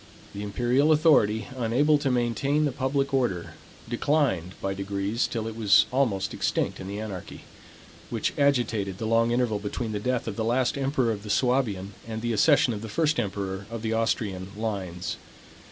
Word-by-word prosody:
The 100 Hz, -, -6 dB
imperial 120 Hz, +8 st, +2 dB
authority, 140 Hz, -9 st, +4 dB
unable 130 Hz, +5 st, +2 dB
to 145 Hz, -2 st, 0 dB
maintain 130 Hz, +5 st, +1 dB
the 145 Hz, -, 0 dB
public 135 Hz, +1 st, -1 dB
order, 120 Hz, -10 st, 0 dB, 0.3 s
declined 120 Hz, -, 0 dB
by 95 Hz, -, -2 dB
degrees 100 Hz, +4 st, -1 dB
till 115 Hz, -2 st, -3 dB
it 110 Hz, -, -5 dB
was 105 Hz, -4 st, +5 dB
almost 115 Hz, -8 st, 0 dB
extinct -, -, -1 dB
in 95 Hz, -, -7 dB
the 100 Hz, +1 st, -5 dB
anarchy, 100 Hz, -5 st, -7 dB, 0.7 s
which -, -, -1 dB
agitated 115 Hz, -9 st, +1 dB
the 110 Hz, -, -4 dB
long 115 Hz, +1 st, +3 dB
interval 120 Hz, -3 st, +1 dB
between 110 Hz, +3 st, -4 dB
the 105 Hz, -, -2 dB
death 125 Hz, +2 st, -1 dB
of 105 Hz, -, -4 dB
the 110 Hz, -, 0 dB
last 120 Hz, +2 st, +1 dB
emperor 135 Hz, -3 st, +1 dB
of 105 Hz, -2 st, -4 dB
the 105 Hz, -, -9 dB
Suabian, 110 Hz, -6 st, +1 dB
and 110 Hz, 0 st, -5 dB
the 120 Hz, -1 st, 0 dB
accession 130 Hz, +2 st, +4 dB
of 105 Hz, -, -5 dB
the 115 Hz, -, -6 dB
first 155 Hz, +4 st, +1 dB
emperor 100 Hz, -2 st, -3 dB
of 115 Hz, -1 st, -6 dB
the 110 Hz, 0 st, -1 dB
Austrian 105 Hz, -4 st, -1 dB
lines. 95 Hz, -5 st, -3 dB
115 Hz, 175 wpm, -26 LUFS, 100-130 Hz, 0.7 s, was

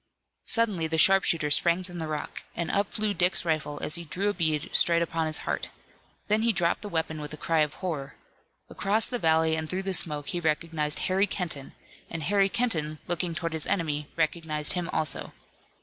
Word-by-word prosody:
Suddenly 210 Hz, -8 st, +1 dB
the 160 Hz, 0 st, -1 dB
sharpshooter 165 Hz, -3 st, +4 dB
sprang 170 Hz, +4 st, +4 dB
from 175 Hz, -1 st, -7 dB
the 160 Hz, -, -1 dB
rock, 150 Hz, -1 st, -4 dB
and 170 Hz, -2 st, -2 dB
up 200 Hz, 0 st, 0 dB
flew 215 Hz, -1 st, -1 dB
Dick's 180 Hz, 0 st, +1 dB
rifle 155 Hz, -3 st, -1 dB
as -, -, -1 dB
he 170 Hz, -, +3 dB
drew 190 Hz, +6 st, -1 dB
a -, -, 0 dB
bead 155 Hz, -5 st, 0 dB
straight 170 Hz, 0 st, +4 dB
upon 165 Hz, -1 st, -1 dB
his 155 Hz, -, +2 dB
heart. -, -, -2 dB, 0.6 s
Then 215 Hz, +1 st, +2 dB
he 230 Hz, +1 st, +3 dB
dropped 175 Hz, -4 st, 0 dB
the 210 Hz, -, -6 dB
weapon 160 Hz, -3 st, -2 dB
with 150 Hz, 0 st, -6 dB
a -, -, -16 dB
cry 165 Hz, +1 st, 0 dB
of 150 Hz, -1 st, +1 dB
horror. 145 Hz, -6 st, -4 dB, 0.5 s
Across 210 Hz, +3 st, +1 dB
the 245 Hz, -, -2 dB
valley 160 Hz, -2 st, +3 dB
and 160 Hz, -1 st, -4 dB
through 185 Hz, +1 st, -1 dB
the 195 Hz, 0 st, -2 dB
smoke 150 Hz, -5 st, +2 dB
he 175 Hz, -, -1 dB
recognized 155 Hz, -2 st, 0 dB
Harry 190 Hz, +2 st, +2 dB
Kenton, 165 Hz, -8 st, -5 dB, 0.3 s
and 165 Hz, -2 st, -5 dB
Harry 195 Hz, +4 st, +3 dB
Kenton 170 Hz, -11 st, -1 dB
looking 175 Hz, -1 st, -2 dB
toward 165 Hz, 0 st, -3 dB
his 160 Hz, -1 st, +2 dB
enemy 150 Hz, -5 st, -1 dB
recognized 155 Hz, -2 st, 0 dB
him 180 Hz, -1 st, -3 dB
also. 155 Hz, -3 st, -2 dB
165 Hz, 195 wpm, -27 LUFS, 155-185 Hz, 0.6 s, sharpshooter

